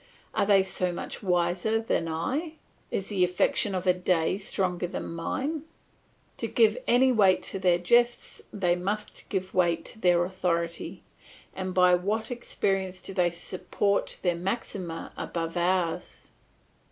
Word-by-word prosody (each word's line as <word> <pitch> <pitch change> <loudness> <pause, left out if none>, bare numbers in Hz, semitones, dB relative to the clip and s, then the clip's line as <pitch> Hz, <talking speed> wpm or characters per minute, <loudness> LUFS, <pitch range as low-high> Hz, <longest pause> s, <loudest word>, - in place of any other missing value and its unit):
Are 200 - +1
they 195 -2 +6
so 185 -1 -1
much 175 - -6
wiser 180 +3 +1
than 220 -7 -1
I, 270 - -2 0.3
is 195 - -3
the 195 -3 +2
affection 180 +2 +2
of 185 0 -2
a 180 - +5
day 180 -2 +1
stronger 185 -2 -1
than 175 - -5
mine? 270 - -2 0.8
To - - -2
give 455 +2 +3
any 260 +2 +5
weight 200 -6 +4
to 195 - -3
their 180 -2 +4
jests 240 +7 +2
they 180 -4 +1
must 205 +4 -4
give 185 -1 -2
weight 170 -2 +2
to 220 - -7
their 175 -3 +4
authority; 170 -2 -2 0.5
and 185 -1 -4
by 180 -1 +6
what 210 +6 0
experience 195 -6 -1
do 195 - -5
they 180 -2 +3
support 190 +3 -1
their 175 -2 +3
maxima 180 -2 -4
above 165 0 -4
ours? 175 -1 -1
185 Hz, 145 wpm, -28 LUFS, 175-205 Hz, 0.8 s, they